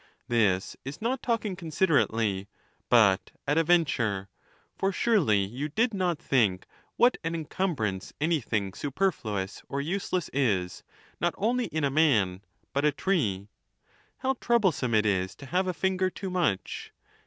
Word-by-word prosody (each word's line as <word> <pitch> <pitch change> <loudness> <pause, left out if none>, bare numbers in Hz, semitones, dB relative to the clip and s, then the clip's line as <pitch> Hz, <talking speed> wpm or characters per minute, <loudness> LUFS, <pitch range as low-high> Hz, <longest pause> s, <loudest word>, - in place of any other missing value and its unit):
This 105 -6 +1
is 135 +2 -7
not 240 +3 -1
talking 220 -5 -1
considerately, 130 - +1 0.4
but 105 -5 +4 0.2
at 145 +3 +3
a - - +3
venture; 115 - +1 0.5
for 195 - 0
surely 160 - +2
you 130 +9 -4
did 230 - +1
not 180 -4 0
think 105 -12 +1 0.3
what 245 +1 +4
an 165 +1 -2
encumbrance 145 - -2
anything 120 - 0
superfluous 120 - -2
or 140 - -2
useless 180 +2 -2
is, 100 -10 0 0.4
not 175 - 0
only 240 +4 +1
in 155 0 -3
a 140 - +2
rnan, 110 - +3 0.3
but 140 +1 0
a 150 - +4
tree. 110 - 0 0.7
How 265 0 -1
troublesome 185 - +2
it 110 0 +3
is 95 -3 0
to 140 - -11
have 180 +7 0
a - - +1
finger 185 +1 0
too 190 +1 -6
much 170 - -1
145 Hz, 140 wpm, -28 LUFS, -, 0.7 s, but